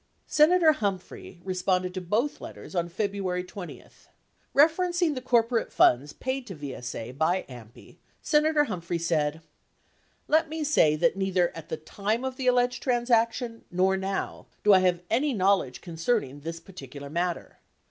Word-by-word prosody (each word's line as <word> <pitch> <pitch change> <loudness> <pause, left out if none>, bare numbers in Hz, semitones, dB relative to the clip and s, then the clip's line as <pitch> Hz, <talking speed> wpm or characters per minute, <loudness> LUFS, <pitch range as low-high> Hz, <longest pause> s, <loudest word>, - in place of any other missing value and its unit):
Senator 320 +1 +5
Humphrey 195 - -4
responded 185 -1 0
to 185 - -4
both 215 +11 -1
letters - - -10
on 170 -2 -1
Febru 200 +2 -2
ary 180 0 -1
20. 180 0 -9 0.7
Eeferencing 345 +2 +3
the 255 - -5
corporate 235 -2 +1
funds 135 +4 +3
paid 260 0 -4
to 190 - -7
VSA 125 -4 -6
by 170 +5 +1
AMPI, 120 -3 -13 0.2
Sena 305 0 +2
tor 300 -2 +4
Humphrey 175 - -3
said: 160 -2 0 0.9
Let 315 +1 +3
me 315 0 -3
say 280 - +4
that 195 +6 +1
neither 190 -2 +1
at 165 -2 -9
the 160 - -3
time 210 +9 -2
of 260 -1 -3
the 260 - -3
alleged 245 0 +2
transaction 235 -1 +1
nor 185 +2 +2
now 190 0 -4 0.2
do 210 - +6
I 190 - +7
have 180 -1 +1
any 270 +5 +2
knowledge 190 - +1
concerning 165 - -2
this 165 +3 -6
particular 165 -5 -10
matter. 175 +1 -3
195 Hz, 155 wpm, -27 LUFS, 170-250 Hz, 0.9 s, I